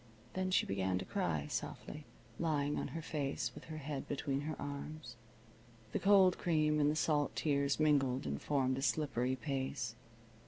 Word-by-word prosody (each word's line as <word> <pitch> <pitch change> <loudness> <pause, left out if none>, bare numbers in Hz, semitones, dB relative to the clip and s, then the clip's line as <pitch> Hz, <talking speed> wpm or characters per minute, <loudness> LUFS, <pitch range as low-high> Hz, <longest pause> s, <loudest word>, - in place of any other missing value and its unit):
Then 185 0 -1
she 185 - +3
began 95 -1 0
to 95 - -4
cry 75 -4 -1
softly, - - -5 0.3
lying 150 -3 +1
on - - -2
her 165 0 -5
face 145 -3 -2
with - - -10
her 155 0 -6
head 145 -2 -4
between 140 -1 -1
her 155 +1 -4
arms. 145 +2 -6 0.8
The - - 0
cold 195 -2 +6
cream 155 -3 +2
and 145 0 +4
the 150 - +1
salt 150 -2 +1
tears 140 -1 +1
mingled 140 - +3
and 70 -1 -3
formed 130 -2 +1
a - - -3
slippery 130 -3 +1
paste. 130 -4 -3
145 Hz, 165 wpm, -36 LUFS, 130-155 Hz, 0.8 s, cold